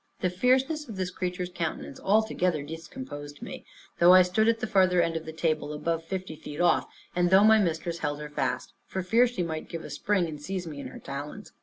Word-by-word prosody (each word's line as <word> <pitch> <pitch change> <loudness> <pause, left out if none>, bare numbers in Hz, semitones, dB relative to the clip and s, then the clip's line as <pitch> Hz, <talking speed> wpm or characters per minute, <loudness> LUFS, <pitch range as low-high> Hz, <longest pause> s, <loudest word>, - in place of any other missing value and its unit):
The 180 - +1
fierceness 260 - +1
of 220 - -6
this 185 -1 -2
creature's 180 0 -3
countenance 165 -5 -4
altogether 185 -6 +1
discomposed 145 - -8
me; - - -8 0.3
though 175 +1 +8
I 185 - +9
stood 200 +5 +2
at 230 0 +3
the 245 - -1
further 185 -4 +3
end 165 -1 +2
of 160 - -3
the - - -4
table, 155 -2 -1
above 165 +2 -2
fifty 185 -1 -5
feet 150 0 -9
off; 175 0 +3 0.3
and 175 0 +3
though 190 +2 +7
my 220 0 +7
mistress 170 -2 -1
held 145 -2 -2
her 150 0 -6
fast, 140 -2 -2
for 190 - -3
fear 230 +7 +4
she 235 -7 -3
might 160 -2 -4
give 165 -1 -5
a - - -8
spring, 200 -4 +1
and 155 -3 -7
seize 185 +3 -4
me 150 -3 -7
in 135 - -6
her - - -10
talons. 145 +9 -7
175 Hz, 220 wpm, -28 LUFS, 160-195 Hz, 0.3 s, I